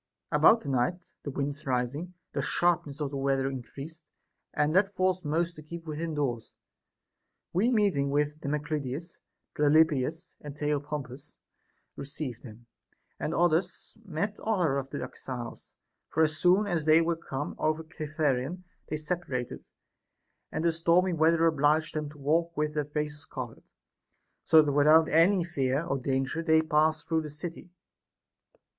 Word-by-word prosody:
26. -, -, +1 dB
About 225 Hz, -, +7 dB
the 140 Hz, -, -6 dB
night, 135 Hz, +8 st, -1 dB
the -, -, -5 dB
wind 140 Hz, +1 st, -2 dB
rising, 140 Hz, +7 st, -2 dB, 0.2 s
the 140 Hz, -, -1 dB
sharpness 155 Hz, -2 st, 0 dB
of 145 Hz, -2 st, -2 dB
the 140 Hz, -, -3 dB
weather 135 Hz, -1 st, +1 dB
increased, 135 Hz, +5 st, -7 dB, 0.5 s
and 150 Hz, +2 st, +1 dB
that 195 Hz, +1 st, +3 dB
forced 185 Hz, 0 st, +1 dB
most 165 Hz, +3 st, 0 dB
to 155 Hz, -, -10 dB
keep 165 Hz, +2 st, -9 dB
within 160 Hz, +1 st, -4 dB
doors; 125 Hz, -6 st, -2 dB, 1.0 s
Ave 200 Hz, +7 st, +3 dB
meeting 200 Hz, -, +2 dB
with 150 Hz, +2 st, 0 dB
Damoclides, 150 Hz, +1 st, -3 dB, 0.4 s
Pelopidas, 155 Hz, +2 st, +2 dB
and 145 Hz, -1 st, -9 dB
The 150 Hz, 0 st, -1 dB
opompus 145 Hz, -1 st, -5 dB, 0.6 s
received 140 Hz, -3 st, -6 dB
them, 120 Hz, -1 st, -12 dB, 0.5 s
and -, -, -2 dB
others 175 Hz, +4 st, 0 dB
met 200 Hz, +2 st, -3 dB
other 180 Hz, -11 st, +1 dB
of 135 Hz, 0 st, -7 dB
the 140 Hz, -, -4 dB
exiles; 125 Hz, -3 st, -7 dB, 0.4 s
for 160 Hz, -, +2 dB
as 155 Hz, 0 st, +1 dB
soon 185 Hz, +5 st, +4 dB
as 175 Hz, -6 st, -1 dB
they 155 Hz, +1 st, +6 dB
were 165 Hz, 0 st, +1 dB
come 145 Hz, -2 st, -5 dB
over 155 Hz, +1 st, 0 dB
Cithaeron, 155 Hz, 0 st, -2 dB, 0.2 s
they 155 Hz, -, -2 dB
separated, 150 Hz, -6 st, -4 dB, 0.8 s
and 160 Hz, -, -2 dB
the 170 Hz, -, +4 dB
stormy 170 Hz, +3 st, +3 dB
weather 165 Hz, +1 st, +3 dB
obliged 155 Hz, 0 st, +2 dB
them 150 Hz, -1 st, -3 dB
to 150 Hz, -, -14 dB
walk 165 Hz, +4 st, 0 dB
with 150 Hz, 0 st, 0 dB
their 150 Hz, -1 st, -1 dB
faces 150 Hz, 0 st, -4 dB
covered, -, -, -7 dB, 0.8 s
so 160 Hz, -1 st, +6 dB
that 145 Hz, -, 0 dB
without 155 Hz, +3 st, +5 dB
any 175 Hz, +4 st, +4 dB
fear 140 Hz, -3 st, -1 dB
or 140 Hz, -, -1 dB
danger 135 Hz, +4 st, -1 dB
they 160 Hz, -1 st, +4 dB
passed 155 Hz, 0 st, +1 dB
through 160 Hz, -1 st, +1 dB
the 155 Hz, -, -6 dB
city. 165 Hz, +4 st, -7 dB
155 Hz, 150 wpm, -29 LUFS, 140-165 Hz, 1.0 s, About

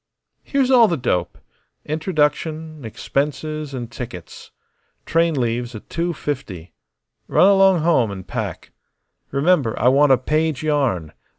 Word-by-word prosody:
Here's 270 Hz, -2 st, 0 dB
all 240 Hz, -3 st, +7 dB
the 170 Hz, -, -1 dB
dope 90 Hz, -9 st, -1 dB, 0.5 s
introduction, 155 Hz, -1 st, -1 dB
expenses, 150 Hz, +5 st, -3 dB
and 120 Hz, -3 st, -6 dB
tickets. 100 Hz, -9 st, -9 dB, 0.6 s
Train 165 Hz, -3 st, +1 dB
leaves 120 Hz, 0 st, -2 dB
at 110 Hz, -, -11 dB
two 170 Hz, +1 st, -1 dB
fifty. 105 Hz, -, -6 dB, 0.5 s
Run 185 Hz, -, +4 dB
along 195 Hz, -3 st, +5 dB
home 155 Hz, -9 st, +2 dB
and 95 Hz, -2 st, -8 dB
pack. -, -, -5 dB, 0.6 s
Remember, 140 Hz, -4 st, +1 dB
I 125 Hz, -, +4 dB
want 140 Hz, +2 st, +4 dB
a 130 Hz, -, +6 dB
page 155 Hz, +2 st, -1 dB
yarn. 130 Hz, -, 0 dB
145 Hz, 125 wpm, -21 LUFS, 120-160 Hz, 0.6 s, all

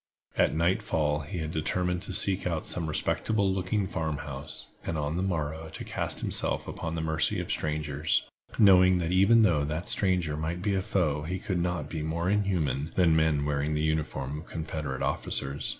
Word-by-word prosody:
At -, -, +2 dB
nightfall 80 Hz, -3 st, +1 dB
he 80 Hz, +6 st, -6 dB
had 80 Hz, -1 st, -3 dB
determined 90 Hz, +2 st, -1 dB
to 95 Hz, -, -6 dB
seek 95 Hz, 0 st, +4 dB
out 80 Hz, -3 st, -2 dB
some 85 Hz, -3 st, -3 dB
respectable 100 Hz, +5 st, +1 dB
looking 95 Hz, +2 st, 0 dB
farm 80 Hz, -5 st, -2 dB
house, 70 Hz, +1 st, -4 dB
and 80 Hz, -, -3 dB
on 75 Hz, +1 st, -2 dB
the 90 Hz, -, -1 dB
morrow 80 Hz, -3 st, -2 dB
to 80 Hz, -, -7 dB
cast -, -, -3 dB
himself -, -, -1 dB
upon 80 Hz, 0 st, -4 dB
the 80 Hz, -, -2 dB
mercy 80 Hz, -1 st, 0 dB
of -, -, -3 dB
strangers, 75 Hz, -1 st, -1 dB, 0.3 s
knowing 95 Hz, -3 st, +6 dB
that 85 Hz, -1 st, -1 dB
even 100 Hz, +5 st, +5 dB
though 85 Hz, -8 st, +3 dB
that 75 Hz, +4 st, -3 dB
stranger 90 Hz, -6 st, +1 dB
might 80 Hz, +4 st, -3 dB
be 100 Hz, -, +1 dB
a 95 Hz, -, +1 dB
foe 80 Hz, -6 st, 0 dB
he 90 Hz, +5 st, -3 dB
could 95 Hz, -1 st, -2 dB
not 85 Hz, -3 st, -1 dB
be 80 Hz, -, -4 dB
more 85 Hz, +4 st, -1 dB
inhuman 85 Hz, -8 st, 0 dB
than 85 Hz, -3 st, +4 dB
men 80 Hz, -2 st, +2 dB
wearing 75 Hz, +1 st, 0 dB
the 75 Hz, -, 0 dB
uniform 75 Hz, -2 st, -1 dB
of 85 Hz, -, -12 dB
Confederate 75 Hz, -4 st, -4 dB
officers. 70 Hz, +1 st, -2 dB
80 Hz, 185 wpm, -28 LUFS, 75-90 Hz, 0.3 s, knowing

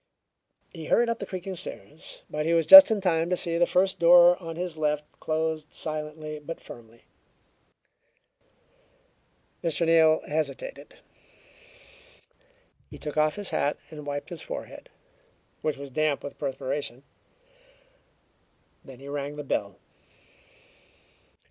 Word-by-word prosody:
He 165 Hz, -3 st, -8 dB
hurried 235 Hz, 0 st, +3 dB
up 230 Hz, -, -2 dB
the 200 Hz, -, -6 dB
creaking 185 Hz, 0 st, -6 dB
stairs, 155 Hz, -1 st, -10 dB
but 150 Hz, +1 st, -3 dB
he 170 Hz, -, +2 dB
was 165 Hz, -1 st, +2 dB
just 290 Hz, -1 st, +12 dB
in 215 Hz, -2 st, 0 dB
time 165 Hz, -3 st, 0 dB
to 180 Hz, -, 0 dB
see 170 Hz, -1 st, -2 dB
the 175 Hz, -, +3 dB
first 190 Hz, +1 st, +1 dB
door 175 Hz, +1 st, +7 dB
on 165 Hz, -1 st, -7 dB
his 175 Hz, -1 st, -4 dB
left 150 Hz, -1 st, -1 dB
closed 155 Hz, -1 st, -3 dB
silently 155 Hz, 0 st, -5 dB
but 165 Hz, +3 st, -8 dB
firmly. 115 Hz, 0 st, -14 dB, 2.6 s
Mr. 170 Hz, 0 st, 0 dB
Neal 160 Hz, -1 st, +4 dB
hesitated. 160 Hz, -, -5 dB, 1.9 s
He -, -, -11 dB
took 150 Hz, -, -6 dB
off 155 Hz, 0 st, +2 dB
his 205 Hz, -1 st, -6 dB
hat 145 Hz, -, 0 dB
and 150 Hz, -2 st, -10 dB
wiped 145 Hz, 0 st, -5 dB
his 170 Hz, -, -7 dB
forehead, -, -, -8 dB, 0.7 s
which 155 Hz, -2 st, -2 dB
was 140 Hz, -1 st, -9 dB
damp 155 Hz, +1 st, 0 dB
with 140 Hz, -, -9 dB
perspiration. 135 Hz, -1 st, -4 dB, 1.8 s
Then 135 Hz, -3 st, -13 dB
he 135 Hz, -, -12 dB
rang 145 Hz, 0 st, -5 dB
the 150 Hz, -, -6 dB
bell. 100 Hz, -8 st, -3 dB
155 Hz, 130 wpm, -26 LUFS, 145-170 Hz, 2.6 s, just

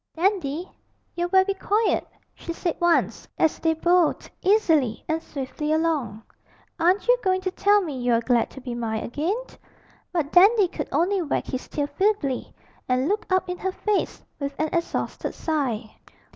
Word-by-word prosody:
'Dandy, 345 Hz, -2 st, 0 dB, 0.5 s
you're 350 Hz, 0 st, -1 dB
very 380 Hz, +1 st, +4 dB
quiet,' 420 Hz, +3 st, 0 dB, 0.3 s
she 335 Hz, -, -7 dB
said 340 Hz, 0 st, -2 dB
once, 345 Hz, -1 st, +2 dB
as 320 Hz, -, +2 dB
they 325 Hz, -1 st, +1 dB
bowled 345 Hz, 0 st, +2 dB
easily 325 Hz, -, +2 dB
and 320 Hz, 0 st, -1 dB
swiftly 300 Hz, +1 st, -4 dB
along. 300 Hz, -10 st, 0 dB, 0.6 s
'Aren't 360 Hz, +6 st, +2 dB
you -, -, +6 dB
going 375 Hz, -1 st, +2 dB
to 370 Hz, 0 st, -2 dB
tell 410 Hz, +2 st, +3 dB
me 290 Hz, -7 st, -5 dB
you're 245 Hz, -2 st, +2 dB
glad 235 Hz, 0 st, +1 dB
to -, -, -11 dB
be 250 Hz, -1 st, -5 dB
mine 225 Hz, -2 st, -2 dB
again?' 315 Hz, -, -1 dB, 0.7 s
But 320 Hz, -5 st, -1 dB
Dandy 395 Hz, +1 st, +6 dB
could -, -, -5 dB
only 375 Hz, +3 st, +1 dB
wag 310 Hz, -, -1 dB
his 260 Hz, -1 st, -5 dB
tail 290 Hz, -, -2 dB
feebly 350 Hz, -6 st, 0 dB, 0.4 s
and 255 Hz, +2 st, +2 dB
look 415 Hz, +4 st, -1 dB
up 370 Hz, -1 st, +2 dB
in 360 Hz, 0 st, -4 dB
her 380 Hz, -, -1 dB
face 415 Hz, +1 st, -1 dB, 0.2 s
with 280 Hz, -1 st, -4 dB
an 310 Hz, 0 st, +1 dB
exhausted 340 Hz, -1 st, -2 dB
sigh. 255 Hz, -9 st, -2 dB
330 Hz, 160 wpm, -24 LUFS, 275-375 Hz, 0.7 s, you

